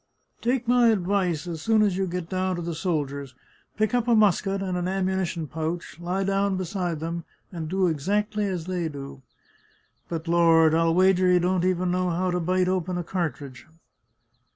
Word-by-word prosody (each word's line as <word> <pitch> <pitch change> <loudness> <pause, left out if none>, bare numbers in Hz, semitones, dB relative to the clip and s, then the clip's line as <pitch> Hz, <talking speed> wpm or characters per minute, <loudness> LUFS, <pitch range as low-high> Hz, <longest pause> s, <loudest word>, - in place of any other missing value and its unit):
Take 245 0 0
my 245 -1 +5
advice, 185 -6 +1
as 165 -3 -5
soon 220 +3 +3
as 200 -3 +1
you 190 0 -1
get 180 -1 -4
down 185 0 -1
to 175 - -5
the 170 0 -3
soldiers, 140 -6 -3 0.4
pick 215 +2 +1
up 245 -1 +1
a 235 - +4
musket 195 -2 +2
and 190 -2 -2
an 180 0 -1
ammunition 190 -3 -1
pouch, 160 +2 -5
lie 180 +3 -2
down 195 0 +1
beside 180 -3 -3
them, 165 +1 -4 0.3
and 165 -4 -5
do 190 +1 +1
exactly 205 +6 0
as 180 -4 -3
they 175 -3 -2
do. 140 -2 -9 0.9
But, 165 0 -4
Lord! 165 -2 +5
I'll 165 0 +2
wager 185 0 +4
you 180 - +5
don't 180 0 +1
even 185 -1 +1
know 180 0 0
how 180 +2 0
to 180 - 0
bite 180 +2 +1
open 185 -1 -1
a 175 - -2
cartridge 140 -8 -4
180 Hz, 180 wpm, -25 LUFS, 165-190 Hz, 0.9 s, my